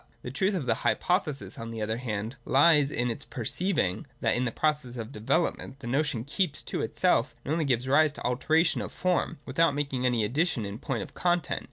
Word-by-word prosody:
The 125 - -5
truth 190 +9 +1
of 165 -8 -2
the 115 - +3
hypothesis 175 -6 0
on 115 0 -5
the 115 -1 -6
other 110 +1 -1
hand 115 -1 -4
lies 145 +1 +5
in 120 -3 -1
its 125 +5 -6
perceiving 135 - -1
that - - +2
in 125 +1 0
the 120 - -1
process 150 -3 -1
of 115 -1 -5
development 130 +4 -1
the 135 - -10
notion 135 -1 0
keeps 150 +4 -1
to - - -3
itself - - +1
and 140 - -3
only 160 0 +1
gives 125 -2 +1
rise 150 +3 +5
to - - -9
alteration 160 +7 +2
of - - -5
form, 180 -2 0
without 145 +2 +2
making 135 -3 -1
any 120 -3 +2
addition 135 - 0
in 100 +2 -6
point 130 -8 -2
of - - -12
content. 175 -3 0
135 Hz, 205 wpm, -28 LUFS, 120-155 Hz, -, lies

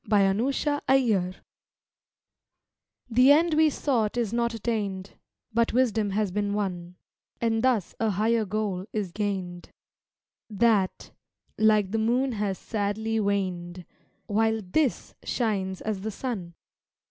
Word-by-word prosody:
THE 215 - 0
END 195 +2 +2
WE 275 - +1
SOUGHT 260 -10 +1 1.7
The 250 +3 +5
end 325 +3 +4
we 310 0 +5
sought 245 -6 0
is 230 -3 -1
not 235 0 0
attained, 205 -4 -3 0.4
But 230 0 +2
wisdom 225 -4 +2
has 200 0 0
been 205 +1 -1
won, 180 -4 -3 0.4
And 225 -1 +1
thus 245 -8 +1
a 225 - +1
higher 220 +3 +1
goal 200 -2 -2
is 205 -5 -2
gained. 190 -3 -4 0.8
That 210 -2 +1 0.5
like 215 -3 +3
the 225 - 0
moon 245 +4 +1
has 205 -4 -2
sadly 220 +1 -2
waned, 185 -4 -2 0.4
While 220 +1 +1
this 255 +9 0
shines 195 -6 -1
as 210 -3 -3
the 220 - -3
sun. 200 -7 -5
215 Hz, 125 wpm, -26 LUFS, 195-235 Hz, 1.7 s, The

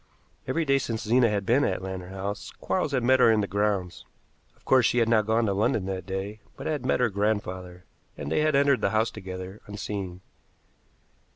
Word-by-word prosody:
Every 160 +5 0
day 140 -1 +3
since 115 -4 -3
Zena 120 +1 +4
had 100 -2 -1
been 125 +7 +3
at 95 -7 -1
Lantern 95 -1 -6
House 100 +2 -5
Quarles 185 -6 -1
had 130 -3 0
met 130 +2 +4
her 115 - +6
in 110 -1 +3
the - - 0
grounds. 100 -3 -1 0.5
Of - - -31
course 130 -2 +5
she 120 - +2
had 115 -2 +3
not 110 -2 +3
gone 115 +1 +2
to 100 - +1
London 100 0 +1
that 95 -2 -4
day, 95 +3 -4 0.2
but - - -8
had 150 -4 -2
met - - +2
her 125 -1 +3
grandfather, 95 -3 -2 0.3
and 70 - -5
they - - +2
had 155 -1 +2
entered 140 -1 +3
the - - +2
house 110 +1 +1
together, 95 -1 -8
unseen. 100 -3 -5
105 Hz, 205 wpm, -26 LUFS, 95-120 Hz, 0.5 s, her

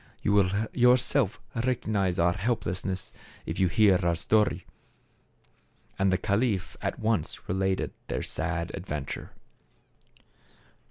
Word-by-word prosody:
You 100 - +2
will 100 -3 +4 0.2
yourself 125 -2 +3
recognize 110 -6 0
our 85 +1 +3
helplessness 95 -3 -2 0.3
if - - -4
you 95 - +4
hear 100 0 +4
our 85 -2 +1
story/' 105 +5 +1 1.4
And 95 0 +3
the 95 - +3
caliph 100 0 0
at - - -2
once 110 -7 -1
related 95 +1 0
their - - -2
sad 85 0 -2
adventure. 75 -7 -5
95 Hz, 110 wpm, -28 LUFS, 90-110 Hz, 1.4 s, will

